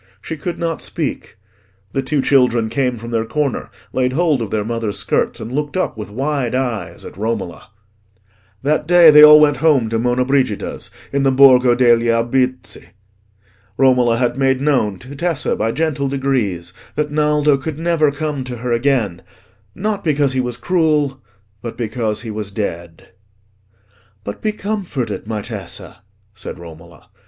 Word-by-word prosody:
She 160 - -6
could 170 +3 -5
not 165 -1 -3
speak. - - -5 0.5
The 135 - -1
two 140 0 -1
children 125 -5 +3
came 125 +1 -1
from 115 +1 -8
their 115 -1 0
corner, 145 +4 -2 0.2
laid 130 0 0
hold 155 -4 +1
of 110 - -3
their 105 0 -2
mother's 115 -2 -3
skirts, - - -1
and 115 +3 -7
looked 145 +4 -2
up 185 - -1
with 105 -2 -7
wide 135 +1 -2
eyes 115 -10 -3
at - - -10
Romola. 105 -5 -4 0.9
That 150 +3 0
day 175 -2 +8
they 150 0 +8
all 150 0 +10
went 145 -1 +4
home 145 -8 +2
to 115 0 -1
Monna 125 +2 +1
Brigida's, 130 -6 -1 0.2
in 140 - +1
the 135 - +3
Borgo 130 -2 +6
degli 120 -1 +4
Albizzi. 125 +2 0 0.9
Romola 125 -3 +3
had 125 +2 0
made 135 -1 +2
known 130 -9 +1
to 130 +8 -11
Tessa, 165 -1 -1
by 110 +1 -1
gentle 150 -1 -1
degrees, 120 -11 -2 0.2
that 150 0 -1
Naldo 150 -1 +2
could 145 +2 -5
never 165 -3 +1
come 145 -1 -3
to 125 -1 -6
her 120 +1 -4
again: 115 -6 0 0.5
not 205 0 -2
because 145 -4 +1
he 130 - +1
was 125 -1 -3
cruel, 150 -3 0 0.4
but 115 - -7
because 110 -2 -2
he 115 - -5
was 105 -1 -4
dead. 85 -5 -6 1.1
"But 100 - -7
be 215 - 0
comforted, 195 - -4
my 105 -2 -3
Tessa," 100 -6 -7 0.3
said 100 +1 -7
Romola. 85 -1 -14
130 Hz, 160 wpm, -18 LUFS, 115-150 Hz, 1.1 s, all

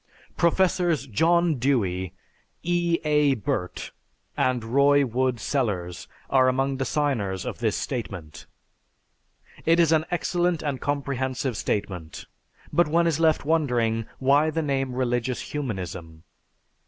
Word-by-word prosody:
Professors 170 -3 +2
John 165 +4 +2
Dewey, 95 -9 0 0.5
E. 175 -1 +1
A. 150 -2 +3
Burtt, 90 -4 -3 0.4
and 125 -2 +1
Roy 140 +4 +4
Wood 130 +1 0
Sellars 100 -10 -2 0.2
are 130 -1 +4
among 135 +1 +1
the 135 - -1
signers 115 - -1
of - - -5
this 110 -3 0
statement. 90 - -6 1.2
It 165 +1 +3
is 165 -2 +4
an 160 -1 +3
excellent 175 -1 0
and 140 -4 -3
comprehensive 135 -3 -2
statement, 90 -7 -3 0.5
but 175 -1 +4
one 170 +3 +2
is 165 -2 +1
left 160 -3 +2
wondering 120 -8 +1
why 140 +4 +3
the 160 +1 -1
name 135 -3 -1
"religious 125 -1 -2
humanism"? 90 - -5
135 Hz, 120 wpm, -25 LUFS, 115-155 Hz, 1.2 s, Roy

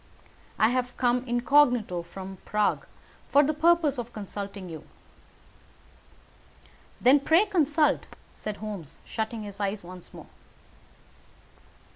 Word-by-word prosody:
I 220 - +4
have 250 0 -2
come 245 0 +2
incognito 240 -6 +3
from 190 +2 -9
Prague 210 -1 0 0.4
for 285 - +6
the 300 +2 +1
purpose 315 -3 +3
of 240 0 -6
consulting 200 -2 -6
you." 160 -2 -8 2.2
"Then, 265 +4 +6
pray 325 +8 +4
consult," 315 -6 +2 0.3
said 210 -1 -5
Holmes, 205 -9 -7
shutting 220 0 -4
his 205 -1 -8
eyes 200 0 -2
once 180 0 -11
more. - - -11
230 Hz, 110 wpm, -27 LUFS, 200-280 Hz, 2.2 s, for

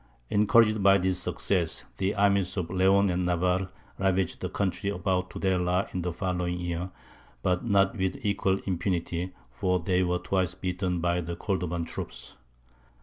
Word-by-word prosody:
Encouraged 110 +1 +4
by 100 0 +6
this 95 -1 0
success, - - 0
the 95 +1 0
armies 100 -2 +2
of 90 -2 -2
Leon 95 +1 +4
and 90 +1 0
Navarre 90 +1 +1 0.3
ravaged 95 -2 +1
the - - -2
country 100 0 -1
about 90 -1 -1
Tudela 90 0 0
in 90 - -1
the 90 0 -2
following 90 0 -2
year, 85 +1 -3 0.5
but 90 -1 +1
not 100 -3 +3
with 95 -3 -1
equal 100 -2 +1
impunity, 90 -1 -2 0.2
for 90 +9 0
they 90 +2 +1
were 90 -1 +1
twice 95 -1 -1
beaten 90 -1 -2
by 85 +1 +1
the 85 0 -5
Cordovan 90 -3 -2
troops. 65 -5 -7
90 Hz, 150 wpm, -28 LUFS, 90-95 Hz, 0.5 s, by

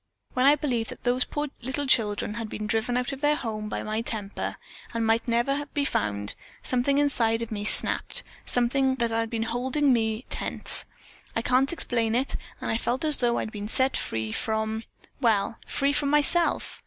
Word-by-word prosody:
When 255 +1 +3
I 290 - +7
believed 250 -6 -1
that - - -10
those 245 +1 +2
poor 295 0 -3
little 265 +4 -2
children 210 -5 +2
had 225 -1 -4
been 215 - -4
driven 225 +3 0
out 250 +2 -1
of 275 0 -7
their 295 0 +4
home 215 -6 -4
by - - -3
my 215 +1 -1
temper, 210 -4 -4 0.4
and 230 -1 +1
might 225 +1 +2
never 275 +5 +1
be 285 -1 +2
found, 100 - -1 0.3
something 255 +3 +1
inside 235 -6 +2
of 230 - -7
me 205 -1 -3
snapped; - - +1 0.2
something 260 +2 +1
that 235 -3 0
had 225 0 0
been 225 -1 -1
holding 255 +5 +1
me 220 0 0
tense, - - +1 0.5
I 225 - 0
can't 255 +3 +3
explain 230 -8 +1
it, 260 +3 0 0.2
and - - -2
I 225 - +2
felt 250 +6 -1
as 305 -1 +4
though 240 -1 +1
I - - 0
had 220 - -6
been 210 -2 -5
set 260 +4 +2
free 110 -1 -2
from 220 - -1 0.3
well, 225 -3 +1
free 280 +1 +1
from 285 -1 +1
myself. 295 +4 +2
235 Hz, 190 wpm, -26 LUFS, 220-270 Hz, 0.5 s, I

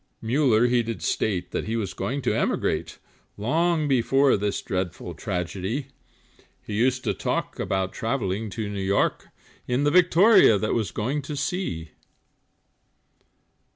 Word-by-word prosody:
Muller 120 -1 +3
he 120 0 +3
did 115 -7 -5
state 90 0 -1
that - - -2
he 115 - -1
was 100 -5 -2
going 135 +8 -3
to 125 - +1
emigrate - - -1 0.4
Long 155 +8 +1
before 135 +1 +3
this 100 0 -1
dreadful 90 -1 -4
tragedy; 95 - -3 0.7
He 105 - -7
often - - -1
used 125 +3 +1
to - - 0
talk, - - -3
about 95 -1 -1
travelling 110 -3 -2
to 105 +2 -4
New 100 -1 -4
York, 95 +1 0 0.4
In 125 +3 +1
the 145 - +3
Victoria, 180 - +6
that 110 +2 -1
was 110 -6 0
going 125 - -2
to 150 +2 -6
sea. 140 - -3
115 Hz, 145 wpm, -25 LUFS, 95-140 Hz, 0.7 s, Victoria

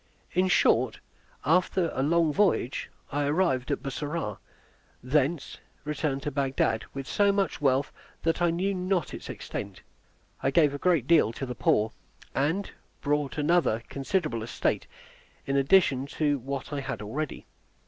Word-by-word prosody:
In 185 +1 +2
short, 125 -9 +3 0.5
after 175 +2 +2
a 130 - -1
long 160 +2 +3
voyage, 190 - +1 0.2
I 145 0 0
arrived 145 -4 +1
at - - -1
Bussorah, 140 - -3 0.6
and 125 - -11
thence 150 +1 +1 0.2
returned 145 -2 -2
to 150 - -2
Bagdad 135 -5 0
with 135 -1 -4
so 200 -1 +3
much 195 -5 -1
wealth 135 0 +2 0.3
that 165 +1 +1
I 175 - +4
knew 185 +4 0
not 185 -1 -1
its - - -8
extent. - - -6 0.6
I - - +2
gave 150 -1 +4
a 145 - -4
great 170 -8 +2
deal 155 -6 +4
to 135 - -4
the 125 - -4
poor, 110 -1 +2 0.4
and 160 +9 0 0.3
bought 145 -1 0
another 150 -7 +2
considerable 140 - -1
estate 115 - -1 0.6
in 135 - -1
addition 140 -2 +4
to 145 -3 +2
what 135 +3 -5
I 145 - -1
had 115 -6 -4
already. 140 +8 -4
145 Hz, 150 wpm, -28 LUFS, 135-170 Hz, 0.6 s, I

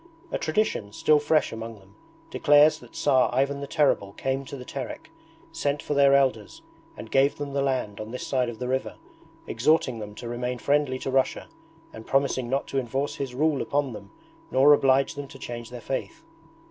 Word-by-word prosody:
A - - -1
tradition, 155 - -1
still 150 +6 +3
fresh 150 +1 +2
among 115 0 -6
them, 100 0 -20 0.4
declares 145 +1 +5
that - - -16
Tsar 130 -3 +3
Ivan 135 +3 0
the 140 - -5
Terrible 135 -11 +1
came 135 +4 -2
to 140 - -8
the 125 - -9
Terek, - - -7 0.4
sent 145 0 -2
for - - -2
their 140 -1 +5
Elders, 130 -6 0 0.3
and 110 - -9
gave 135 +1 +3
them 145 -1 -5
the 140 - 0
land 130 -7 -1
on 110 0 -6
this 125 +2 -6
side 130 -3 0
of 115 - -7
the 125 - -4
river, 130 +1 -2 0.5
exhorting 130 0 +1
them 105 -1 -8
to 120 - -8
remain 125 +1 -3
friendly 140 +1 +1
to 135 - -4
Russia 135 0 0 0.4
and 110 0 -10
promising 135 -3 +1
not 135 +2 0
to 135 - 0
enforce 135 +3 -3
his 135 -3 -4
rule 150 0 +1
upon 140 -3 -1
them 100 -2 -10 0.4
nor 140 +3 +6
oblige 135 -1 +3
them 145 -1 -7
to 135 - -12
change 120 -3 -7
their 125 0 -8
faith. 325 - -5
135 Hz, 195 wpm, -26 LUFS, 120-140 Hz, 0.5 s, nor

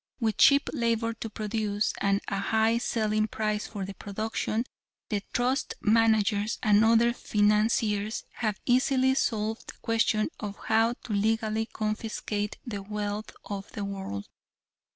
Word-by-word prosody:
With 220 -3 0
cheap 280 0 +6
labor 230 -3 0
to 225 0 -6
produce, 215 -1 -1
and 200 0 +2
a 195 - -1
high 220 +2 +2
selling 215 -2 0
price 215 -1 -2
for 200 -3 -5
the 195 - -6
production, 215 +3 -2 0.4
the 210 -2 0
trust 250 +3 0
managers 220 -1 +3
and 210 -1 +5
other 230 +1 +4
financiers 210 -1 +1
have 215 -3 -1
easily 260 +1 +3
solved 220 -4 -1
the - - -10
question 225 0 +2
of 205 -2 -5
how 225 +1 +2
to 225 - -4
legally 220 +1 +1
confiscate 215 -1 -3
the 210 -5 -4
wealth 210 +1 -4
of 200 -1 -6
the 205 - -3
world." 190 - -5
215 Hz, 135 wpm, -28 LUFS, 205-225 Hz, 0.4 s, cheap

